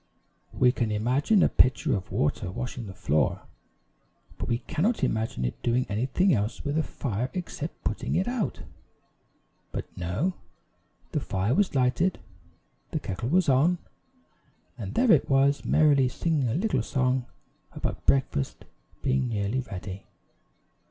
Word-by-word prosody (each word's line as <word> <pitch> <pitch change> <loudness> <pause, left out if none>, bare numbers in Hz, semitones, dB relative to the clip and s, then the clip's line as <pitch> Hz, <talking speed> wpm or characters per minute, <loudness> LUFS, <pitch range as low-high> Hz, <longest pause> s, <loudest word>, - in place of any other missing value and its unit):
We 125 -1 +5
can 120 -4 -1
imagine 130 - +3
a - - +6
pitcher 130 +2 +3
of 95 -3 -5
water 75 - 0
washing 120 +2 -5
the 95 - -7
floor, 75 +2 +1 1.0
but - - -3
we 115 - +2
cannot 170 - -1
imagine 110 - 0
it - - -4
doing 125 +1 +1
anything 130 - +2
else 105 0 -1
with 145 +1 -1
a 160 - +3
fire 125 -5 -3
except 170 -3 -5
putting - - -2
it 185 - +1
out. 245 -4 -2 1.1
But, - - -4
no! 90 - -1 0.8
the - - 0
fire 100 +4 -1
was 190 -1 +2
lighted, 135 +8 +2 0.7
the - - -2
kettle 105 +6 -4
was 180 +2 +3
on, 145 +7 +4 1.0
and - - -6
there 240 0 +4
it - - +4
was, 140 +1 +3
merrily 145 -4 +4
singing 150 -1 0
a 115 - -1
little 215 +7 +1
song 130 -2 0 0.5
about - - -4
breakfast 130 - +1 0.4
being 130 -1 +1
nearly 105 +2 -1
ready. 95 -5 -7
130 Hz, 140 wpm, -27 LUFS, 110-160 Hz, 1.1 s, a